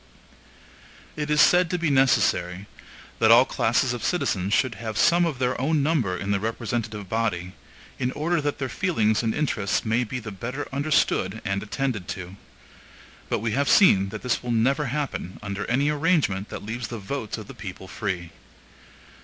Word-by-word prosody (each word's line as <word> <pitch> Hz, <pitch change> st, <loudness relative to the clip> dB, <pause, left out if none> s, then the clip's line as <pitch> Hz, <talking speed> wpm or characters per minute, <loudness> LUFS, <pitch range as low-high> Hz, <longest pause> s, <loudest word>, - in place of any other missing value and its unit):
It 150 Hz, -1 st, -3 dB
is 150 Hz, 0 st, +2 dB
said 180 Hz, +1 st, +5 dB
to 180 Hz, -, 0 dB
be 170 Hz, -3 st, 0 dB
necessary, 100 Hz, -8 st, +2 dB, 0.5 s
that 110 Hz, -, +4 dB
all 120 Hz, +3 st, +8 dB
classes 125 Hz, +2 st, +1 dB
of 120 Hz, -, -5 dB
citizens 105 Hz, -, 0 dB
should 125 Hz, +2 st, +2 dB
have 110 Hz, -2 st, -4 dB
some 175 Hz, +1 st, +4 dB
of 155 Hz, -6 st, -3 dB
their 125 Hz, 0 st, -1 dB
own 150 Hz, +1 st, +1 dB
number 130 Hz, -, +1 dB
in 100 Hz, +3 st, -3 dB
the 100 Hz, -, +1 dB
representative 110 Hz, -1 st, -3 dB
body, 90 Hz, -5 st, -2 dB, 0.5 s
in 125 Hz, -1 st, 0 dB
order 165 Hz, +2 st, 0 dB
that 145 Hz, 0 st, -2 dB
their 135 Hz, -, -2 dB
feelings 110 Hz, -, +1 dB
and 115 Hz, -2 st, 0 dB
interests 120 Hz, -11 st, 0 dB
may 115 Hz, +3 st, +1 dB
be 125 Hz, +2 st, -5 dB
the 110 Hz, -2 st, -7 dB
better 120 Hz, +9 st, -5 dB
understood 135 Hz, -8 st, +1 dB
and 100 Hz, -1 st, -1 dB
attended 110 Hz, -3 st, -3 dB
to. 90 Hz, 0 st, -6 dB, 0.9 s
But -, -, 0 dB
we 115 Hz, 0 st, -1 dB
have 140 Hz, +4 st, +1 dB
seen 100 Hz, -, +5 dB
that -, -, -7 dB
this 125 Hz, -, 0 dB
will 125 Hz, -, -6 dB
never 130 Hz, +6 st, +2 dB
happen 135 Hz, -8 st, -3 dB
under 100 Hz, 0 st, -4 dB
any 135 Hz, +4 st, +2 dB
arrangement 150 Hz, -, +1 dB
that -, -, -7 dB
leaves 115 Hz, +1 st, -4 dB
the 120 Hz, -, -6 dB
votes 110 Hz, +2 st, -4 dB
of -, -, -8 dB
the -, -, -10 dB
people -, -, -8 dB
free. 85 Hz, -3 st, -4 dB
120 Hz, 180 wpm, -25 LUFS, 105-145 Hz, 0.9 s, all